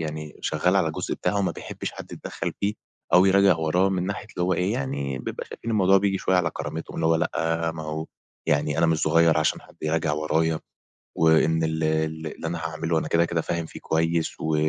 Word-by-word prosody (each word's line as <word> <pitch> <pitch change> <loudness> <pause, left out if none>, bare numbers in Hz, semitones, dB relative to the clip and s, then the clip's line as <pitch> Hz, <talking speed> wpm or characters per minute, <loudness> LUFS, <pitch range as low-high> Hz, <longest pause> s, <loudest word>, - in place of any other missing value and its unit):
يعني 75 -1 -5
شغَّال - - +1
على - - +3
الجزء - - -3
بتاعه، 100 - -1
وما 100 - +1
بيحبِّش - - -6
حد - - -10
يتدَخَّل - - -5
فيه، 105 +1 0 0.4
أو 90 +1 +7
يراجع 95 -2 +5
وراه، 85 +4 +2
من 95 -1 -1
ناحية 100 +1 -4
اللي - - 0
هو 90 +1 +2
إيه، 90 +4 0
يعني 70 - -2
بيبقى - - -5
شايفين 115 - -6
الموضوع 95 -3 +4
بييجي 95 -1 0
شوية 95 - +2
على 85 -3 +2
كرامتهم، 80 +1 -6
اللي 80 - +1
هو 80 - +4
لأ، 80 +1 0
ما 80 - -6
هو 80 +1 -4 0.4
يعني 75 +1 +1
أنا 85 - +4
مش 80 -1 +2
صُغيَّر 80 0 +4
عشان 75 - +1
حد - - -19
يراجع 80 -1 0
ورايا، 80 +1 +1 0.6
وإن 80 0 +4
ال 80 0 -1
ال 80 0 0
اللي 80 - -6
أنا 85 +1 -2
هاعمله، 80 0 -1
أنا - - -4
كده، 85 +1 +3
كده 85 -1 -1
فاهم 85 +1 -2
فيه - - -10
كويِّس، 80 0 0
و 80 0 0
80 Hz, 210 wpm, -25 LUFS, 80-90 Hz, 0.6 s, أو